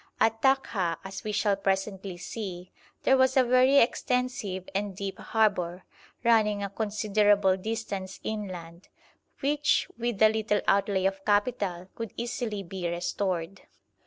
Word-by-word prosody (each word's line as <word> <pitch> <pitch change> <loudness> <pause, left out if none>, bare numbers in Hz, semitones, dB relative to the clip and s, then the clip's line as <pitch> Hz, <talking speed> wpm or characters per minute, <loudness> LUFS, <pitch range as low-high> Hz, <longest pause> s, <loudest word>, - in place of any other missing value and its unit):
At 225 0 +2
Takha, 215 -11 +1
as 195 0 -7
we 215 - -3
shall 205 -1 +2
presently 195 -1 -2
see, 185 -2 -6 0.3
there 265 - +5
was 260 0 +3
a 260 - +7
very 255 +3 +5
extensive 250 -6 0
and 200 0 -2
deep 195 0 -5
harbour, 190 -5 0 0.4
running 215 -3 +3
a 200 - -4
considerable 205 -2 +2
distance 195 -2 -4
inland, 185 -5 -6 0.5
which 295 +1 +2
with 235 -3 -2
a 215 - +8
little 215 -1 0
outlay 195 -1 +2
of 195 0 -1
capital 205 -4 0
could 230 -3 -6
easily 235 -4 -3
be 175 -1 -4
restored. 175 +1 -2
205 Hz, 130 wpm, -28 LUFS, 190-225 Hz, 0.5 s, a